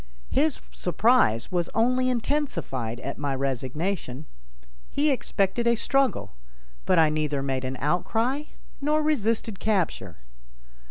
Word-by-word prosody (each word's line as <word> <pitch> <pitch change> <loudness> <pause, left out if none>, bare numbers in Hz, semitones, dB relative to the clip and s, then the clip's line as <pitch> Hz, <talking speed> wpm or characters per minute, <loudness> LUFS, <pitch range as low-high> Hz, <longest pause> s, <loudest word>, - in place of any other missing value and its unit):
His 295 +1 +2
surprise 180 - +2
was 175 -2 0
only 255 +3 +3
intensified 230 - -2
at 140 +1 -5
my 140 -2 -1
resignation. 135 +3 -2 0.6
He 295 +1 +2
expected 235 -2 0
a 235 - +4
struggle, 255 - +1 0.5
but - - +4
I 160 -2 +5
neither 150 -2 -1
made 135 -1 -1
an 130 0 -3
outcry 225 - 0 0.4
nor 305 +2 +2
resisted 230 -8 0
capture. 200 -6 -1
195 Hz, 115 wpm, -26 LUFS, -, 0.6 s, I